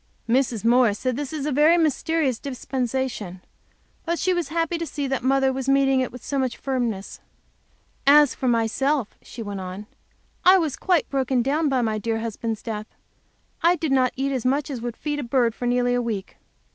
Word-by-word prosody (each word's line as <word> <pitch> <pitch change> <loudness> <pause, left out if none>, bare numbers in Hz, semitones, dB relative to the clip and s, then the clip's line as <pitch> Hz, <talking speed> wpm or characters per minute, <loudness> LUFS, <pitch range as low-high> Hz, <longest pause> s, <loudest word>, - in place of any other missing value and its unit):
Mrs. 235 -2 +1
Morris 235 -3 +4
said 255 +1 -1
this 280 0 -4
was 300 -3 -4
a 300 - -1
very 300 +5 +5
mysterious 310 -4 +1
dispensation. 255 -7 -3 0.6
But 340 - -1
that 340 - -3
she 370 - +1
was 350 -4 -1
happy 330 +2 -1
to 335 - -2
see 290 -2 -3
that 270 -1 -1
Mother 265 +1 +2
was 265 0 -3
meeting 270 -1 +3
it 255 - -1
with 250 - -11
so 280 - -1
much 260 -2 -1
firmness. 240 -7 -3 0.9
"As 290 -1 +7
for 260 - -3
myself," 240 +2 +1
she 235 - -8
went 205 -2 -5
on, 185 +3 -7 0.6
"I 370 +1 +7
was 315 -7 -1
quite 360 -5 +1
broken 265 -2 +1
down 295 +4 +1
by 260 -3 +1
my 215 -1 -1
dear 225 +1 -1
husband's 225 0 -4
death. 215 -2 -5 0.7
I 340 +2 +4
did 315 -4 -2
not 255 -2 +3
eat 275 +1 -1
as 260 -3 -2
much 275 +3 0
as 250 -4 -5
would 240 -1 -5
feed 295 -1 -3
a - - -3
bird, 240 -1 +1
for 245 - -4
nearly 245 0 +2
a 245 - +1
week. 215 -5 -4
260 Hz, 200 wpm, -24 LUFS, 235-290 Hz, 0.9 s, As